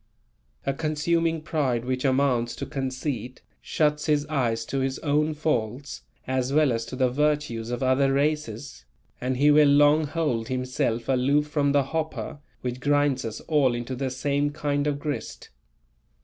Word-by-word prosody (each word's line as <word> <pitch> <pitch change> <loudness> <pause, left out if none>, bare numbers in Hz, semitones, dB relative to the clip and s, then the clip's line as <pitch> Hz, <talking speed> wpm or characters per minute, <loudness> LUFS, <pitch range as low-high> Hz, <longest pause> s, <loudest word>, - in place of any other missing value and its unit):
A 135 - +1
consuming 165 +2 0
pride 130 -7 -1
which 130 0 -2
amounts 130 -3 +1
to - - -5
conceit, 130 -2 -4 0.2
shuts 150 -1 0
his 150 -1 +2
eyes 120 -7 -1
to 135 - -2
his 135 0 -1
own 150 +1 +1
faults 140 -2 -2 0.2
as 130 0 -1
well 150 -1 +4
as 115 -1 -1
to 115 - -7
the 130 0 +2
virtues 145 -5 0
of 120 +1 -2
other 135 +1 +3
races, 135 - -2 0.4
and 130 +1 -1
he 145 +3 +5
will 150 0 +6
long 145 +2 +5
hold 145 -8 -1
himself 125 -2 -1
aloof 135 +3 +2
from 145 -2 +1
the 140 0 +3
hopper 160 +1 -4 0.2
which 125 0 -4
grinds 145 -1 +2
us 110 -2 -5
all 140 -6 +2
into 120 +2 -4
the 130 +1 -2
same 140 +3 0
kind 145 -1 -1
of 145 -1 0
grist. 145 0 -5
140 Hz, 160 wpm, -25 LUFS, 125-150 Hz, 0.4 s, will